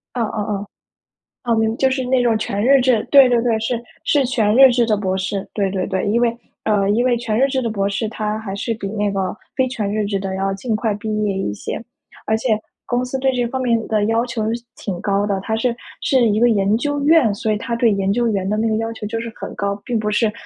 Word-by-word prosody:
嗯 240 - 0
嗯 210 -1 -3
嗯， 200 - -8 0.8
嗯， 235 -2 +1
明 220 0 +1
就 265 - +3
是 260 0 -1
那 255 0 +2
种 230 -2 +2
全 205 -1 -2
日 275 +2 +5
制， 245 -4 +2
对 275 -3 +7
对 240 -1 +3
对， 230 -2 +1
是 230 +1 -2 0.2
是 285 -3 +2
全 220 -4 +1
日 270 0 +9
制 240 -1 +2
的 215 -2 +1
博 190 -2 -1
士。 190 +1 -3
对 195 -3 0
对 185 -1 -2
对， 190 0 -1
因 220 +3 +2
为 235 -1 +2 0.3
呃， 205 -2 +2
因 235 +5 +2
为 245 - +3
全 230 -2 -1
日 270 - +4
制 265 -1 -1
的 230 - -1
博 200 -2 -1
士 200 +2 -2
它 215 -1 -3
还 210 -3 -6
是 230 +3 -2
比 200 -3 -5
那 205 0 -1
个 190 -1 -2 0.2
非 260 - +2
全 215 -5 -3
日 215 -1 0
制 200 -1 -1
的 190 -1 -4
要 195 0 -1
尽 220 +3 -2
快 215 -1 0
毕 215 0 -2
业 205 - 0
一 105 - -2
些。 105 - -5 0.5
而 220 - +2
且 235 +2 -3 0.4
公 245 +1 0
司 265 +1 -3
对 265 0 +2
这 245 -1 0
方 260 +2 -3
面 230 -3 +1
的 215 -2 +1
要 225 +2 +1
求 230 -3 -3
是 235 - -4
挺 185 -4 -5
高 200 0 +1
的。 200 -2 -1
它 220 +2 -2
是 235 +1 0 0.3
是 255 -4 +3
一 210 0 +1
个 240 +1 +5
研 205 0 +2
究 290 +3 -2
院， 305 -9 +5
所 220 +1 -2
以 - - -1
它 235 +2 -4
对 230 0 +3
研 195 0 0
究 240 +2 +1
员 195 -4 -1
的 210 - 0
那 225 +1 +1
个 220 - +1
要 225 +1 -2
求 210 - -6
就 225 +2 -3
是 230 -1 -6
很 - - -7
高， 200 0 -2
并 245 -3 -1
不 210 -1 -1
是 215 0 +2
220 Hz, 285 characters per minute, -20 LUFS, 205-240 Hz, 0.8 s, 日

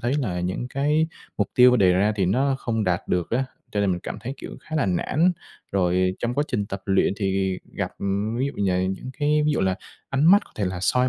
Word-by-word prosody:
thấy 120 +3 0
là 95 -11 -2
những 95 +7 -3
cái 150 +4 +1 0.3
mục 105 - 0
tiêu 125 0 +7
đề 95 -4 +5
ra 100 +4 +2
thì 95 -3 +1
nó 135 +8 +2
không 115 -4 -1
đạt 90 -1 -1
được 90 -1 0
á, 130 +3 +1 0.3
cho 105 - 0
nên 100 - +2
mình 90 -1 -1
cảm - - -5
thấy, 130 +4 -5
kiểu, - - -9
khá 155 +2 -5
là 140 - +2
nản. 155 - +2 0.4
Rồi 90 -1 +2
trong 120 +1 -2
quá 145 - +1
trình 105 -4 -1
tập 100 -1 -6
luyện 95 -1 +3
thì 95 -2 0
gặp, - - -3
ừm, 100 +3 -1
ví 135 - +1
dụ, 140 - -4
nh 95 0 +1
những 130 +6 -7
cái 150 0 +2
ví 150 - +3
dụ - - 0
là 95 -1 +2 0.4
ánh 135 +2 +1
mắt 200 +4 +7
có - - -21
thể 105 - -1
là 90 -1 -2
soi 125 +6 +2
105 Hz, 250 wpm, -24 LUFS, 95-135 Hz, 0.4 s, tiêu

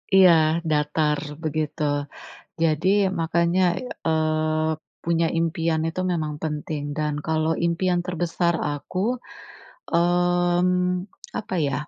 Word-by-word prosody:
Iya, 190 -2 +8 0.4
datar 150 0 +1 0.2
begitu. 155 -1 -2 0.8
Jadi, 165 +2 +2 0.3
makanya, 170 +2 +1 0.2
ya, 250 - -8 0.2
eee, 155 0 +1 0.3
punya 170 0 +2
impian 165 -1 0
itu 165 +3 -3
memang 155 -3 -2
penting, 150 -1 -3
dan 150 -1 -1
kalau 160 0 +1
impian 175 +1 +1
terbesar 175 0 0 0.2
aku. 145 +5 -5 0.9
Mmm, 175 +1 +2 0.3
apa 205 - -5
ya, 140 - -1
165 Hz, 100 wpm, -24 LUFS, 155-175 Hz, 0.9 s, Iya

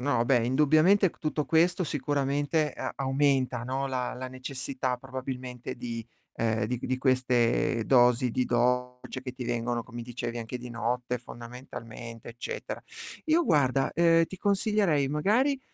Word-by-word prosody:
No, 125 -3 +1
beh, 120 -2 +3
indubbiamente 155 +8 +4
c - - -25
tutto 150 -1 -1
questo 175 +3 +3
sicuramente 145 +1 0
a - - -4
aumenta, 135 -2 +1
no, 130 +2 -2
la 130 -2 -2
la 130 +1 -5
necessità 130 0 -3
probabilmente 130 -1 -6
di 120 -2 -5 0.3
ehm, 110 -2 +1
di 120 +2 -2
di 130 0 -1
queste 125 -3 +2
dosi 125 -1 +4
di 125 +2 0
dolce 125 +1 0
che 130 -1 -6
ti 125 -1 -6
vengono, 120 0 -1
come 120 0 -8
dicevi, 120 0 -5
anche 115 +2 -5
di 125 0 -8
notte 125 +1 -2
fondamentalmente, 115 -1 -9
eccetera. 120 +1 -6 0.4
Io 325 +2 +4
guarda, 135 -5 +2
ehm, 165 0 +5
ti 190 +2 -10
consiglierei, 200 -8 +2
magari, 235 - +2
130 Hz, 145 wpm, -28 LUFS, 120-145 Hz, 0.4 s, ehm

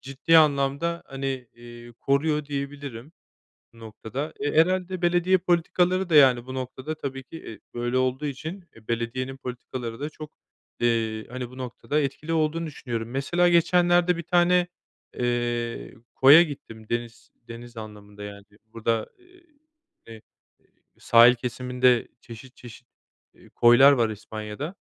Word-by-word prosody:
ciddi 135 +5 +3
anlamda, 150 +3 +1
hani, 135 0 -6 0.3
eee, 120 0 -13
koruyor 150 +2 +1
diyebilirim 140 -1 -6 0.6
bu 115 - -18
noktada. 115 +7 -6
Eee, 145 +1 -2
herhâlde 185 +1 -1
belediye 175 +2 +3
politikaları 180 +1 +1
da, 160 - +2
yani, 130 -4 +6
bu 130 - -8
noktada 130 +4 -5
tabii 135 -3 -6
ki, 165 +6 -11
eee, 110 -9 -10
böyle 120 +1 -2
olduğu 130 +3 0
için, 160 +6 -7
eee, 110 -1 -18
belediyenin 125 +3 -3
politikaları 125 -2 -7
da 150 - -4
çok, 155 0 -11 0.5
eee, 115 -2 0
hani, 125 0 -6
bu 130 - -14
noktada 130 +4 -3
etkili 150 +3 -3
olduğunu 160 +1 0
düşünüyorum. 120 -6 -5
Mesela 170 +7 +1
geçenlerde 175 +1 +3
bir 170 - -5
tane, 175 +1 +3 0.5
eee, 120 -1 -2 0.2
koya 145 +6 +8
gittim. 115 -8 -10
Deniz 120 0 -5 0.2
deniz 120 0 -11
anlamında, 105 -1 -10
yani, 100 0 -9 0.3
burada, 115 -1 -1
eee, 360 -1 -23 0.6
eee, 115 -1 -11 0.8
sahil 120 +1 +6
kesiminde 125 0 0
çeşit 120 +2 -13
çeşit, 120 0 -13 0.5
eee, - - -20
koylar 120 +4 +7
var 120 -5 +2
İspanya’da. 110 - -7
130 Hz, 135 wpm, -25 LUFS, 120-160 Hz, 0.8 s, koya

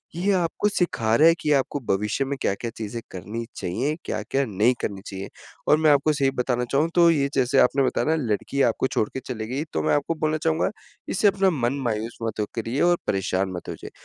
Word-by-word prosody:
ये 185 +4 +1
आपको 180 +2 0
सिखा 145 - 0
रहा 155 +6 +6
है 165 - +7
कि 150 - 0
आपको 140 +1 0
भविष्य 105 +7 0
में 140 0 -3
क्या-क्या 100 +4 -1
चीज़ें 110 +1 -5
करनी 105 +5 -5
चाहिए, 125 +12 -2
क्या-क्या 140 - -1
नहीं 110 +2 +2
करनी 100 -2 -3
चाहिए? 95 0 -6 0.4
और 150 - +6
मैं 155 -1 +4
आपको 145 +2 +3
सही 140 -2 +1
बताना 125 -1 -1
चाहूँ, 150 +4 +2
तो 170 -1 +6
ये 140 -3 +1
जैसे 130 +1 +3
आपने 135 +2 +4
बताया 130 - 0
ना 160 - +3 0.2
लड़की 135 +6 -1
आपको 125 +3 0
छोड़ 110 - 0
के - - -3
चली 120 -4 -5
गयी। 135 +5 -2
तो - - -1
मैं - - +2
आपको 145 +3 -1
बोलना 155 0 0
चाहूँगा, 160 +1 +1 0.4
इससे 205 - +3
अपना 195 -1 +3
मन 130 -6 0
मायूस 115 -1 -2
मत 110 -1 -3
हो 105 - +1
करिए 115 +4 -2
और 175 0 +4
परेशान 95 0 0
मत 90 - -7
हो - - -4
जाए। - - -7
135 Hz, 220 wpm, -24 LUFS, 110-155 Hz, 0.4 s, है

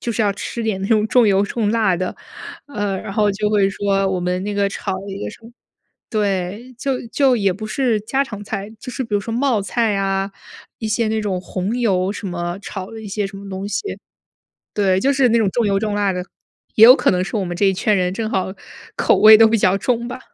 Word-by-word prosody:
就 235 - -3
是 220 - 0
要 205 - +2
吃 230 +3 -5
点 210 -4 -1
那 195 - -3
种 215 -1 +3
重 245 -1 +4
油 195 -1 +3
重 210 +1 -1
辣 215 -5 +2
的， 185 +1 -3 0.5
呃， 205 -8 -2
然 195 - -7
后 210 -1 +2
就 210 +1 -1
会 200 -2 +3
说 195 0 0
我 185 - -1
们 180 +1 -1
那 205 - -3
个 200 -1 +1
炒 195 0 -4
了 190 +1 -6
一 195 +1 -6
个 - - -4
什 - - -13
么 230 - -12 0.6
对， 205 +3 -2
就 265 -2 -2
就 265 0 +3
也 200 -3 +1
不 215 +3 -7
是 235 -2 0
家 265 +6 0
常 210 -5 -8
菜， 200 -1 -5
就 250 - -7
是 260 - -3
比 220 - -4
如 205 - +2
说 225 +3 -6
冒 250 -4 +1
菜 225 0 0
啊， 195 0 -1 0.5
一 220 - -4
些 225 +1 +1
那 220 0 0
种 195 -4 -2
红 190 +5 -3
油 190 -5 +1
什 210 - -6
么， 175 +1 -4
炒 190 -2 -7
了 225 - -9
一 220 - -9
些 205 +1 -2
什 195 0 -10
么 200 0 -9
东 195 +1 -5
西。 - - -1 0.9
对， 190 -3 +2
就 275 +7 +2
是 260 -3 +3
那 235 - +3
种 210 -4 +2
重 235 +1 0
油 195 -1 +2
重 210 -1 -2
辣 200 -2 +1
的， 180 0 -3 0.5
也 220 - +9
有 250 - +10
可 - - +2
能 180 0 +1
是 195 - -5
我 200 - 0
们 175 -1 -4
这 200 - +2
一 190 - +3
圈 210 +3 +1
人 180 0 0
正 220 +1 -3
好 190 -2 -1 0.4
口 - - +3
味 215 0 +9
都 225 - +7
比 225 - +2
较 195 -1 +3
重 235 +3 -1
吧。 250 - -6
205 Hz, 270 characters per minute, -20 LUFS, 195-225 Hz, 0.9 s, 有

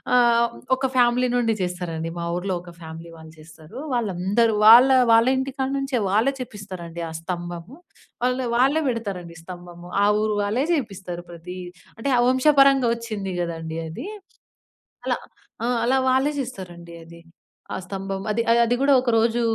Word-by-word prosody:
ఆహ్, 235 -1 +4 0.3
ఒక 265 - -2
ఫ్యామిలీ 245 0 +3
నుండి 230 -2 +1
జేస్తారండి. 175 -2 -3
మా 170 - -3
ఊరులో 185 +1 -2
ఒక 175 - -11
ఫ్యామిలీ 165 +1 -9
వాళ్ళు 160 0 -13
చేస్తారూ. 155 0 -14 0.2
వాళ్ళందరు 210 +1 +1
వాళ్ళా 255 +4 +8
వాళ్ళ 230 +1 +5
ఇంటికాడ 265 0 -3
నుంచే, 275 -2 -1
వాళ్ళే 225 +7 +2
చెప్పిస్తారండి 185 -7 -8
ఆ - - -9
స్తంభము. 175 +5 -6 0.5
వాళ్ళె, 250 +1 +1
వాళ్ళే 270 +5 +3
బెడతారండి 195 -8 -5
స్తంభము. 175 0 -10 0.2
ఆ - - +5 0.2
ఊరు 215 -1 0
వాళ్ళే 225 +7 0
జేపిస్తారు 195 - -4
ప్రతీ 175 +2 -9 0.4
అంటే, 225 +5 -3
ఆ - - +3
వంశపరంగా 275 0 +4
ఒచ్చింది 215 -5 -5
గదండీ 165 -2 -4
అది, 160 - -7 1.0
అలా. - - 0 0.5
ఆ! - - +1 0.2
అలా 255 +3 +2
వాళ్ళే 265 +3 +2
జేస్తారండి 180 -10 -7
అది. 170 +1 -14 0.5
ఆ - - -2
స్తంభం, 195 +1 -5
అది 225 +2 +1
ఆహ్, 230 - +5
అది 235 +1 +1
గూడా 280 +1 +4
ఒకరోజూ 235 -1 +1
210 Hz, 145 wpm, -23 LUFS, 175-250 Hz, 1.0 s, వాళ్ళా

